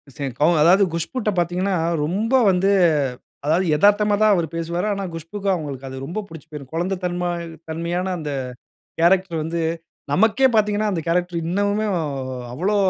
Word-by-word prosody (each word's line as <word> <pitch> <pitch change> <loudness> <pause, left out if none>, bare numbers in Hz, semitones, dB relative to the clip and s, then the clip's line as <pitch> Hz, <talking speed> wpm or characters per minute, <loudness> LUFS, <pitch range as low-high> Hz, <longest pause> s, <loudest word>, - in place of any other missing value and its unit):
சரி 140 -3 -3
கௌ 150 - +4 0.2
அதாவது 185 +5 +6
குஷ்புட்ட 210 +7 -2
பாத்தீங்கணா, 180 +3 0 0.3
ரொம்ப 205 - -1 0.2
வந்து 185 +2 +2 0.8
அதாவது 170 +5 +2
எதார்த்தமா 205 +2 +4
தான் 215 -1 +6
அவரு 170 -2 0
பேசுவாரு. 170 +4 -2
ஆனா 200 0 -3
குஷ்புக்கும், 195 +4 -2
அவங்களுக்கு 140 -5 -6
அது 130 - -7
ரொம்ப 180 +9 -4
பிடிச்சு 160 -3 -12
போய்ரும். 140 -3 -9
குழந்த 180 +4 -1
தன்ம 175 0 -1 0.4
தன்மையான 175 +3 -2
அந்த 150 -2 -5 0.7
கேரக்டர் 180 0 +3
வந்து, 165 +1 -2 0.5
நமக்கே 225 - +4
பாத்தீங்கணா 210 0 +2
அந்த 170 - -1
கேரக்டர் 175 0 0
இன்னமுமே 205 +4 0 0.7
அவ்ளோ 190 +11 0
180 Hz, 145 wpm, -22 LUFS, 165-205 Hz, 0.8 s, அதாவது